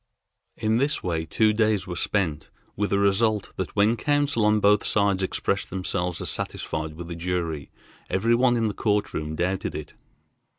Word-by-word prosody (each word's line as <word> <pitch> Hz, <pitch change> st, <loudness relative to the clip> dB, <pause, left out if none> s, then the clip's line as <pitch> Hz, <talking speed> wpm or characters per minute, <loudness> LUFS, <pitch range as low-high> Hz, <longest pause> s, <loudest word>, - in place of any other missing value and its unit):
In 110 Hz, +1 st, +1 dB
this 140 Hz, +4 st, 0 dB
way 80 Hz, -3 st, -2 dB
two 110 Hz, +4 st, +3 dB
days 105 Hz, -3 st, +2 dB
were 90 Hz, -3 st, -5 dB
spent, 85 Hz, -6 st, -1 dB, 0.3 s
with 105 Hz, 0 st, -1 dB
a 100 Hz, -, +3 dB
result 100 Hz, +1 st, +1 dB
that 95 Hz, -, -4 dB
when 105 Hz, +3 st, +4 dB
counsel 145 Hz, -3 st, +1 dB
on 105 Hz, 0 st, +4 dB
both 105 Hz, 0 st, +4 dB
sides 100 Hz, -2 st, +2 dB
expressed 95 Hz, +1 st, -1 dB
themselves 90 Hz, -1 st, -2 dB
as -, -, -2 dB
satisfied 80 Hz, 0 st, -4 dB
with 85 Hz, +1 st, -7 dB
the 85 Hz, -, -5 dB
jury, 85 Hz, -4 st, -3 dB, 0.4 s
every 115 Hz, +5 st, +2 dB
one 120 Hz, 0 st, +3 dB
in 115 Hz, -1 st, +1 dB
the 105 Hz, -, -2 dB
court 105 Hz, -1 st, 0 dB
room 75 Hz, 0 st, -3 dB
doubted 90 Hz, +3 st, -1 dB
it. -, -, -7 dB
100 Hz, 175 wpm, -25 LUFS, 90-110 Hz, 0.4 s, when